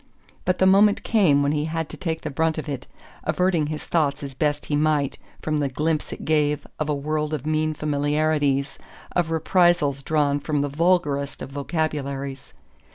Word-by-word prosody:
But 185 0 +1
the 190 - +3
moment 200 +2 +5
came 170 -11 +3
when 140 - +2
he 150 0 0
had 160 0 -2
to - - -8
take 165 -3 -3
the - - -4
brunt 160 +3 0
of 155 - -4
it, 135 -3 -5 0.4
averting 170 -1 +1
his 155 0 -5
thoughts 150 -3 0
as 140 -1 -6
best 145 +2 -1
he 150 - -1
might 150 -2 +1 0.2
from 155 -1 0
the 140 -2 0
glimpse 155 +3 -1
it - - -7
gave 150 -2 +1
of 155 -1 -1
a 150 - +1
world 150 +2 -1
of 145 - -7
mean 155 0 0
familiarities, 145 -1 0 0.3
of 175 -2 0
reprisals 165 -4 +2
drawn 145 -1 +1
from 145 0 -1
the 145 - -1
vulgarest 145 -3 +1
of - - -8
vocabularies. 140 -2 -3
150 Hz, 180 wpm, -24 LUFS, 145-160 Hz, 0.4 s, moment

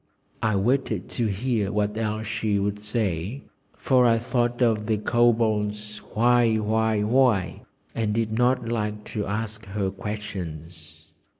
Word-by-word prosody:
I 110 -2 +1
waited 110 -1 0
to 115 - -1
hear 105 0 -1
what 105 0 0
else 110 0 -2
she 110 -1 -1
would 100 +1 -2
say, 105 - -2 0.3
for 130 -2 +3
I 115 -1 +4
thought 120 0 -1
of 110 -3 +1
the 110 -2 +1
Kobold's 105 -2 +1 0.2
"Why? 120 0 +4
Why? 110 0 +1
Why?" 115 -5 +2 0.3
and 110 -2 -1
did 110 0 0
not 125 0 +2
like 105 -2 -2
to 105 -2 -2
ask 110 +1 -4
her 95 -1 -2
questions. 85 -6 -7
110 Hz, 135 wpm, -25 LUFS, 105-115 Hz, 0.3 s, I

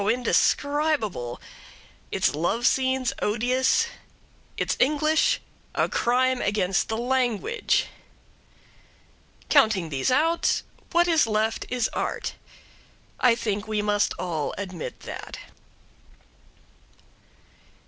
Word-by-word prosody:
indescribable; 250 - +1 0.7
its - - +1
love 175 +10 -1
scenes 260 -1 +2
odious; 250 - +2 0.7
its - - 0
English 305 +3 +2 0.4
a - - +2
crime 255 +1 +1
against 195 -2 0
the 220 - -1
language. 250 - 0 1.6
Counting 210 - +3
these 135 -3 -1
out, 325 +6 +2 0.3
what 345 0 +3
is 320 -8 +3
left 220 +1 -1
is 245 -2 0
Art. - - -3 0.9
I 245 -2 +5
think 210 -3 -3
we 215 -1 -1
must 205 0 +1
all 165 -5 -3
admit 185 -4 -6
that. - - -7
240 Hz, 90 wpm, -25 LUFS, 205-265 Hz, 1.6 s, I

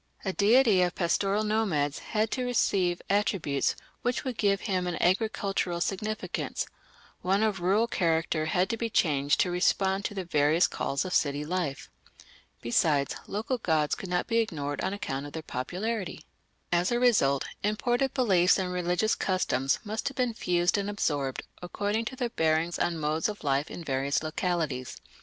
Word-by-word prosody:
A 190 - -1
deity 215 -1 +5
of 180 -1 +1
pastoral 195 +4 +1
nomads 195 -10 0
had 215 0 -1
to 255 - -1
receive 190 -7 +1
attributes 195 -8 +1 0.3
which 245 0 -1
would 255 -2 -3
give 200 -2 +1
him 185 -3 -1
an 175 - -2
agricultural 195 -2 0
significance; 210 +4 -2 0.6
one 195 +3 +2
of 210 -4 0
rural 195 +6 +3
character 165 -6 0
had 180 +3 +2
to 230 - -2
be 230 0 -2
changed 145 -8 +2
to 180 - +1
respond 190 +2 +1
to 205 - -3
the 190 -2 -3
various 155 +1 +3
calls 140 +6 -2
of 185 - -4
city 145 0 +1
life. 170 -4 -2 0.8
Besides, 140 +4 +2
local 225 +5 -2
gods 155 -6 +1
could 190 - -5
not 180 0 0
be 230 -1 +1
ignored 145 -10 -2
on - - -1
account 145 -8 -4
of 145 - -12
their 160 - -5
popularity. 180 - -4 0.5
As 175 +3 +2
a 240 - +2
result, 175 - +3 0.2
imported 240 +6 0
beliefs 190 -9 +4
and 185 -2 -2
religious 180 +4 +1
customs 135 -8 0
must 215 +1 -3
have 275 - -5
been 250 -3 +1
fused 175 -1 +1
and 200 0 -2
absorbed 145 -10 -1 0.2
according 205 +5 -2
to 260 - -5
their 245 -2 -2
bearing 160 -4 +1
on 175 -1 0
modes 155 +4 0
of 210 - -7
life 140 +1 0
in 175 - -7
various 140 0 0
localities. 155 -5 -2
180 Hz, 165 wpm, -28 LUFS, 155-210 Hz, 0.8 s, deity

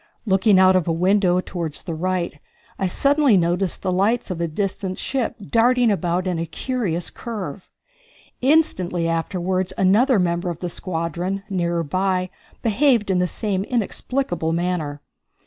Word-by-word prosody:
Looking 195 0 +4
out 185 0 +6
of 180 -3 +1
a - - +2
window 180 +1 +3
toward 170 -5 -4
the 165 - -4
right, 175 -2 -2 0.4
I 190 - +1
suddenly 280 +3 +3
noticed 175 +1 0
the 185 - 0
lights 200 +4 +1
of 170 -2 -4
a 170 - 0
distant 190 +2 -3
ship 260 -4 -2 0.2
darting 240 0 +4
about 180 -1 0
in 180 -3 -1
a 165 - -3
curious 180 - -2
curve. 200 -6 -6 0.7
Instantly 215 - +2
afterward 180 +2 -1
another 220 +7 +4
member 175 -1 0
of 170 - -4
the 180 - -4
squadron, 175 +2 -3
nearer 170 -2 0
by, 185 +3 -1 0.3
behaved 230 -2 +3
in 185 - +2
the 180 - +2
same 195 -1 -2
inexplicable 210 -6 -1
manner. 165 -4 -2
185 Hz, 145 wpm, -22 LUFS, 170-210 Hz, 0.7 s, out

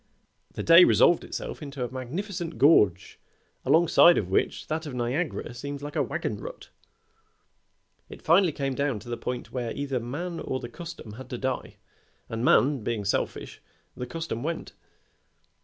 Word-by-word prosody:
The - - -4
day 170 +2 +9
resolved 175 -1 +5
itself - - -6
into 140 -4 -4
a 120 - -8
magnificent 165 - -5
gorge 105 - +4 0.4
alongside 170 +1 +6
of 95 -3 -2
which - - 0
that 160 0 -3
of 135 - -6
Niagara 125 +3 -2
seems 140 +3 -6
like 145 0 -7
a - - +2
wagon - - -2
rut. - - -9 1.4
It - - -11
finally 175 +2 +4
came 135 -2 -2
down 140 -2 -1
to 120 - -11
the 120 - -2
point 125 +1 -5
where 120 -3 -3
either 140 -2 -2
man 165 +9 -5
or 130 - -3
the 120 - -7
custom 170 -4 -9
had 130 +4 -10
to 125 - -4
die, 130 0 -3 0.5
and 115 +1 -3
man 135 -1 +4
being 110 -2 -2
selfish, 100 - -2 0.3
the 125 - -5
custom 160 -4 -4
went. 165 +4 -4
140 Hz, 160 wpm, -27 LUFS, 120-165 Hz, 1.4 s, day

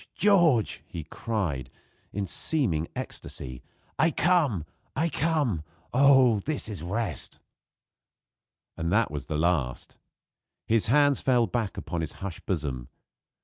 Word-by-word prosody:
George!" 170 - +4
he 80 - -6
cried, 80 - -3 0.4
in 100 0 -2
seeming 90 - 0
ecstasy, 65 -2 -6 0.4
"I 160 +3 +5
come! 150 - +2 0.3
I 165 +1 +1
come! 150 - +1 0.3
Oh! 130 -4 +6
this 145 +5 -1
is 105 -6 -3
rest!" 95 - -2 1.4
And 85 0 -2
that 105 -1 +2
was 75 -3 -5
the 75 - -2
last. 80 -6 -1 0.7
His 110 -1 +2
hands 145 +3 +4
fell 125 -3 +3
back 115 -4 -2
upon 85 -2 -3
his 80 -1 -4
hushed 95 -4 -7
bosom. 70 -9 -2
105 Hz, 120 wpm, -27 LUFS, -, 1.4 s, Oh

